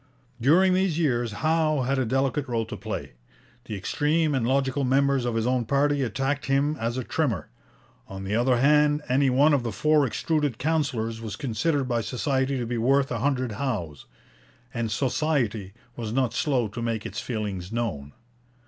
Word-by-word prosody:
During 180 +9 +5
these 185 -3 +1
years 120 -8 +1
Howe 155 +3 +1
had 135 +2 0
a 130 - +1
delicate 135 +3 0
role 115 -2 -1
to - - -7
play. - - -5 0.5
The 110 - -5
extreme 150 - 0
and 125 -4 0
logical 135 +1 +1
members 135 0 +2
of 120 -2 -1
his 115 0 0
own 125 -1 +1
party 140 +3 +1
attacked 135 +3 -1
him 140 +2 +2
as 115 +2 -2
a 130 - -2
trimmer; 120 - -1 0.6
on 95 0 -7
the 95 +2 -3
other 120 +2 +3
hand, 150 +3 +3
any 135 +2 +3
one 140 +4 +4
of 140 - +3
the 120 -1 -3
four 150 +7 +3
extruded 145 +1 -1
councillors 130 -8 -1
was 110 -3 -5
considered 135 +5 -1
by 120 -2 0
Society 130 +3 -1
to 120 - -2
be 120 0 -2
worth 135 +3 +2
a 115 - -1
hundred 130 -1 0
Howes, 100 - -4 0.7
and 115 -1 -2
Society 120 -5 0 0.2
was 115 -3 -5
not 125 -1 0
slow 130 -6 +1
to 110 +3 -6
make 115 -2 -2
its - - -4
feelings 105 -5 -4
known. 95 -12 -3
130 Hz, 175 wpm, -25 LUFS, 115-145 Hz, 0.7 s, During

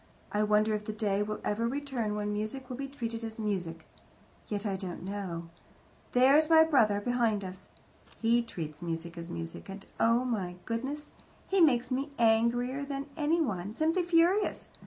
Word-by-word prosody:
I 210 - +1
wonder 215 +1 +3
if 210 0 -2
the 215 - -3
day 205 -2 0
will 210 0 -2
ever 230 +3 0
return 255 -5 -2
when 210 0 -2
music 215 +6 -3
will - - -3
be 275 +2 -4
treated 230 -4 -5
as 225 -1 -5
music. 180 -7 -3 0.6
Yet 210 0 -3
I 200 -2 0
don't 185 -2 -6
know. 180 -4 -5 0.6
There's 275 +5 +5
my 320 -1 +8
brother 230 -10 +3
behind 230 -2 +1
us. 185 0 -9 0.5
He 230 +1 +3
treats 155 -9 -6
music 170 0 -4
as 170 0 -7
music, 165 +2 -6
and 195 0 -8
oh, 230 +2 +3
my 195 -8 -2
goodness! 270 +6 -4 0.4
He 385 -1 +3
makes 250 -5 +4
me 270 +3 -1
angrier 235 +4 +2
than 280 0 -4
anyone, 290 - 0
simply 320 +6 +2
furious. 350 +4 +2
225 Hz, 165 wpm, -30 LUFS, 200-270 Hz, 0.6 s, my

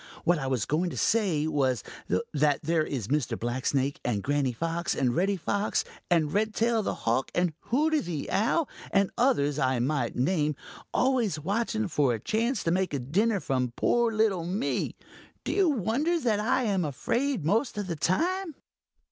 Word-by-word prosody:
What 175 -2 +3
I 135 - -3
was 130 -6 0
going 170 +4 0
to - - -7
say 190 -9 +2
was 135 -5 0 0.5
that 145 -1 +2
there 160 0 +2
is 125 -9 -4
Mr. 145 -4 0
Blacksnake 130 +3 -1
and 105 -5 -1
Granny 145 -2 +1
Fox 165 +7 -2
and 125 -3 +1
Reddy 195 +3 +1
Fox 205 +4 0 0.3
and 160 -4 +2
Redtail 220 +2 +1
the - - -2
Hawk 120 +4 0
and 175 -2 +1
Hooty 305 +5 +2
the 170 - -4
Owl 245 +9 +2 0.2
and 195 -1 +2
others 150 - +2
I 130 -2 +2
might 125 -1 -1
name, 150 +2 +1 0.4
always 240 - +1
watching 220 +5 -1
for 145 -7 +2
a - - -6
chance 225 - -1
to 165 - +1
make 185 -3 0
a - - -1
dinner 195 - +1
from 130 -6 -1
poor 235 -1 +2
little 215 -5 +1
me. 190 +8 -2 0.5
Do - - -2
you 390 -4 +3
wonder 280 - +1
that 225 -7 +1
I 235 +4 +1
am 195 -5 +1
afraid 215 - -1
most 225 - +1
of 205 - -2
the 175 -3 -3
time?" 335 - 0
175 Hz, 175 wpm, -28 LUFS, 145-225 Hz, 0.5 s, What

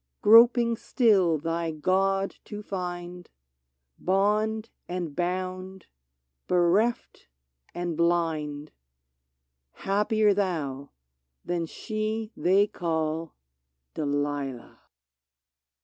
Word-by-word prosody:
— - - -54
Groping 235 +1 +6
still 195 -12 +3
thy 165 +2 -2
God 195 +5 0
to 210 0 -7
find, 180 -2 -6 0.7
Bond 215 +4 0 0.2
and 175 -5 -4
bound, 185 +1 -3 0.6
bereft 180 +7 +1 0.5
and 175 -1 -3
blind, 155 -3 -1 0.6
— 65 0 -54
Happier 210 +1 +2
thou 150 -9 -2 0.6
than 170 -1 -2
she 215 +3 -4
they 195 +3 +3
call 160 -3 -3 0.6
Delilah 145 -3 -3
180 Hz, 80 wpm, -27 LUFS, 160-205 Hz, 0.7 s, Groping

